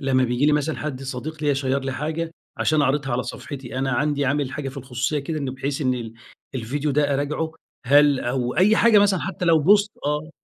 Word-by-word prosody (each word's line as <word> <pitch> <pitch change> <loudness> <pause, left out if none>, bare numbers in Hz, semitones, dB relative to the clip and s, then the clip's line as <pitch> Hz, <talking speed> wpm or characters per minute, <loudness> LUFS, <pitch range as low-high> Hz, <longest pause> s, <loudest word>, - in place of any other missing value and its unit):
لمّا 130 -2 +2
بييجي 125 +4 +1
لي 150 - +4
مثلًا 150 +1 0
حد 140 -3 -5
صديق 140 +4 -6
ليّا 145 -1 +2
شير 135 0 0
لي 135 0 -3
حاجة 160 +4 -3 0.3
عشان 155 -2 +2
أعرضها 135 -1 0
على 125 +1 0
صفحتي 130 0 -7
أنا، 135 0 0
عندي 145 +2 0
عامل 140 0 0
حاجة 145 -2 -4
في 135 - -10
الخصوصية 135 +2 -2
كده 155 +3 -3
إن 140 -3 -3
بحيث 135 +2 -3
إن 130 -3 +1
ال 115 -2 -6 0.4
الفيديو 135 +5 -2
ده 145 0 +2
أراجعه 150 +3 -2 0.4
هل 145 0 +5
أو 125 0 -2
أي 210 +4 +5
حاجة 230 -3 +6
مثلًا 200 -3 +3
حتى 185 -1 -4
لو 165 -2 +5
بوست 205 +6 +4 0.2
آه 150 +2 -2
145 Hz, 215 wpm, -23 LUFS, 130-155 Hz, 0.4 s, حاجة